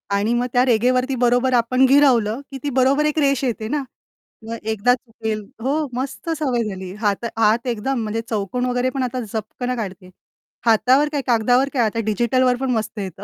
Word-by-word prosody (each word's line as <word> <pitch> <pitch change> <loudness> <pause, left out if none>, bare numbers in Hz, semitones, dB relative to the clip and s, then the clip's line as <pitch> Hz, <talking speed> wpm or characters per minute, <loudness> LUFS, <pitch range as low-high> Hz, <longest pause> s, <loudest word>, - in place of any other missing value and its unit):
आणि 210 +4 +1
मग 240 +1 +1
त्या 250 0 +4
रेघेवरती, 255 +2 +2
बरोबर 245 +1 +2
आपण 245 +2 +2
गिरावलं 260 -5 +4
की 270 - -6
ती 290 - -1
बरोबर 270 +3 +3
एक 300 +1 0
रेष 275 -2 +2
येते 230 -4 -2
ना, 290 +4 -1 0.6
मग 230 - -4 0.2
एकदा 220 +4 +3
चुकेल, 225 -3 -5 0.2
हो, 290 +5 0
मस्त 270 +6 -5
सवय 255 -6 0
झाली. 185 -2 -7
हात 205 +1 0
हात 225 +3 +2
एकदम 245 +3 -1
म्हणजे 220 +1 -2
चौकोन 220 +3 -2
वगैरे 250 0 0
पण 270 - 0
आता 255 0 -3
झपकन 225 +3 -4
काढते. 190 -5 -6 0.6
हातावर 255 +6 +4
काय, 290 -2 -1
कागदावर 245 +3 +3
काय, 250 -4 +2
आता 220 +1 -2
डिजिटलवर 245 +4 +2
पण 265 -1 0
मस्त 220 -2 -2
येतं. 190 -2 -6
245 Hz, 180 wpm, -21 LUFS, 220-260 Hz, 0.6 s, त्या